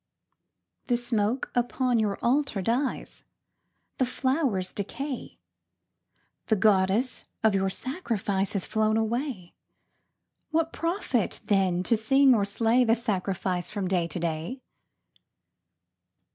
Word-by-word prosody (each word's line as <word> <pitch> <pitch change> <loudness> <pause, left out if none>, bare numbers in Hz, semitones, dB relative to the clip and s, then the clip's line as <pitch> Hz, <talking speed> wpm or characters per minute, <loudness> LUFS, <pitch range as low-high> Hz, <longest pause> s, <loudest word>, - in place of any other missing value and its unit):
_) - - -41
The 245 - +2
smoke 235 0 0
upon 245 0 +1
your 210 -2 0
Altar 250 -5 +1
dies, 250 +6 -2 0.8
The 255 - +2
flowers 260 - 0
decay, 265 +7 -5 1.1
The 220 - +3
Goddess 205 +4 +2 0.2
of 220 -2 +4
your 195 0 +1
sacrifice 205 - -2
Has 200 -3 -1
flown 220 0 +1
away. 225 - -2 1.0
What 325 0 0
profit, 330 - -1
then, 185 -3 +2
to 230 - +2
sing 265 +5 +4
or 205 -4 +2
slay 225 +4 +2
The 225 -1 +4
sacrifice 185 -5 -2
from 200 -3 -3
day 180 -2 +1
to 170 +2 -5
day? 170 +10 -3
220 Hz, 115 wpm, -27 LUFS, 195-255 Hz, 1.1 s, of